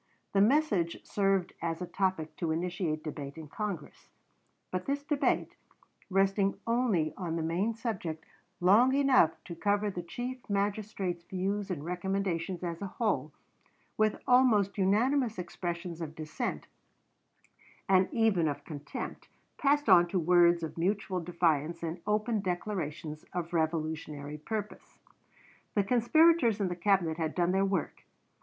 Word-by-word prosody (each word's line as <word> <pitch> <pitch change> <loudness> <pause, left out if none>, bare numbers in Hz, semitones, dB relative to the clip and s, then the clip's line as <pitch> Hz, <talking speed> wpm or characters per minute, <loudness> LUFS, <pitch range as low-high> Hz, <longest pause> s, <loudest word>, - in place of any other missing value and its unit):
The 195 - +4
message 210 - +2
served 195 -3 +1
as 165 -1 -2
a 180 - -3
topic 180 -3 -1
to 170 - -2
initiate 165 -1 -2
debate 145 -2 -6
in 160 -2 -8
Congress; 185 -1 -6 0.6
but 185 0 -3
this 285 +1 -1
debate, 295 -1 0 0.6
resting 195 +1 +2
only 225 -10 +1
on 170 -4 -3
the 165 - -1
main 185 +8 0
subject 185 -9 -4 0.3
long 220 +9 +5
enough 270 - +5
to 170 - -7
cover 205 +3 +1
the 180 - -4
Chief 245 +9 -5
Magistrate's 200 -3 -1
views 195 +2 -2
and 160 -5 -4
recommendations 180 0 -2
as 170 0 -4
a 200 - -3
whole, 220 +3 -1 0.6
with 215 -1 +1
almost 235 -6 +4
unanimous 225 +5 +2
expressions 175 -1 -5
of 160 -1 -5
dissent, 155 -1 -4 1.2
and 190 -1 +4
even 220 -8 +2
of 145 - -4
contempt, 150 -3 -7 0.3
passed 290 +1 +2
on 175 0 +7
to 185 - -1
words 175 0 +4
of 160 +1 -5
mutual 190 +1 0
defiance 170 -2 0
and 165 +1 -4
open 215 +1 +1
declarations 170 -5 -4
of 175 -1 -4
revolutionary 155 -2 -2
purpose. 210 +5 -6 0.8
The 205 - +3
conspirators 245 - +4
in 195 -3 0
the 175 - -3
Cabinet 175 -3 +2
had 160 -2 -2
done 175 0 +2
their 195 +1 +2
work. 190 -5 -2
185 Hz, 135 wpm, -30 LUFS, 165-210 Hz, 1.2 s, on